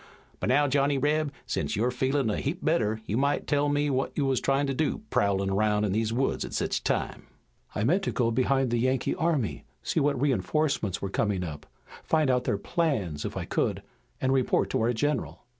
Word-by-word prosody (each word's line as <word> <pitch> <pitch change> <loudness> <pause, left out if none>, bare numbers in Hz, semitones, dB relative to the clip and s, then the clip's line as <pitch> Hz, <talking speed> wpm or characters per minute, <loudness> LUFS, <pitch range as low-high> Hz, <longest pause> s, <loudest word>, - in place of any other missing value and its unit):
But - - -1
now, 145 +3 +4
Johnny 140 +1 +2
Reb, 150 +2 +1
sence - - -2
you're 120 +5 +1
feelin' 130 -1 0
a - - -1
heap 150 +6 -3
better 110 -9 +1
you 105 - -1
might 140 +2 +1
tell 145 0 +1
what 145 -2 0
you 145 - +2
wuz 135 -1 +1
tryin' 135 +1 +2
to 135 - -1
do, 155 +9 -1
prowlin' 100 -1 +1
roun' 105 +1 +2
in 105 - +1
these 110 +2 0
woods 130 +4 0
at - - -6
sech - - 0
a - - -4
time." - - -2 0.5
"I 105 - 0
meant 170 - +3
to - - 0
go 115 -2 +1
behind 130 +1 +1
the 120 - +1
Yankee 130 +2 +1
army, 160 - -1 0.2
see - - 0
what 140 -2 +1
reinforcements 130 - 0
were 100 - -3
coming 100 -4 0
up, 75 -3 -7 0.3
find 155 -4 +2
out 125 0 +1
their 100 - +1
plans, 100 - -1
if - - -4
I - - -3
could, - - -1 0.4
and 130 0 +1
report 130 -2 +1
to - - +1
our 115 +2 +2
general." 140 +4 -2
130 Hz, 210 wpm, -27 LUFS, 110-145 Hz, 0.5 s, now